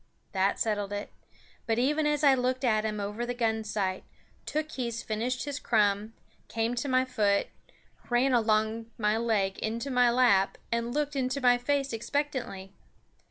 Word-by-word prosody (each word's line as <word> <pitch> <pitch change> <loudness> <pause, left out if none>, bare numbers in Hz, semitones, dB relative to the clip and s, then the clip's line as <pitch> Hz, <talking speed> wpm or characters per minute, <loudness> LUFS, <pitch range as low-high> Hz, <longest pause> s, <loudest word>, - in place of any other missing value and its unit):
That 195 +1 +1
settled 205 -2 -1
it; 205 0 -5 0.6
but 225 -1 +1
even 295 +5 +2
as 295 0 0
I 280 -2 +7
looked 255 0 0
at 220 -3 +2
him 215 -1 -2
over 205 +3 -3
the 245 0 -3
gun 225 -2 0
sight, 195 -3 -2 0.4
Tookhees 255 -7 -3
finished 240 +3 -2
his 285 -1 -4
crumb, 210 -2 +1 0.3
came 225 +1 -1
to 245 +3 -2
my 255 0 +3
foot, 210 -5 +1 0.6
ran 250 +2 +3
along 220 -1 +1
my 210 -1 +1
leg 210 -4 0
into 230 +5 -3
my 250 -1 +4
lap, 235 -6 +3
and 235 0 -1
looked 295 +1 -1
into 260 +1 -1
my 245 -2 +4
face 275 +1 0
expectantly. 230 -6 -3
235 Hz, 160 wpm, -29 LUFS, 215-255 Hz, 0.6 s, I